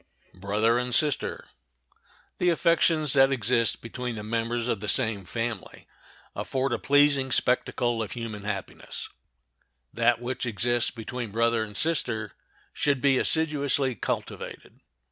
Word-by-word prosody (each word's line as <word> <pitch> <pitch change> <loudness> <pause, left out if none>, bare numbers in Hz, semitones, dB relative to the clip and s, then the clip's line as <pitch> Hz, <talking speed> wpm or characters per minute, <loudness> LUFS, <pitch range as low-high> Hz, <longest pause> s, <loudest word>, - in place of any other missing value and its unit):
] - - -36
The 115 +7 +1 1.1
affections 165 -3 +3
that 135 -1 +5
exist 120 -2 +1
between 125 +1 -5
the 105 - -6
members 115 +2 -2
of 115 - -1
the 105 - -6
same 110 -5 +1
family 115 -1 -5 0.5
afford 135 -1 -1
a - - -1
pleasing 145 -2 +3
spectacle 120 -2 +1
of 105 -3 -4
human 115 -4 -6
happiness. 100 -3 -5 0.8
That 115 0 +2
which 125 +1 -4
exists 120 +2 +1
between 120 0 -6
brother 115 +1 +1
and 105 -1 -7
sister 120 -10 0 0.4
should 140 -2 +1
be 135 -1 +3
assiduously 145 -4 +2
cultivated. - - -5
120 Hz, 120 wpm, -26 LUFS, 115-135 Hz, 1.1 s, that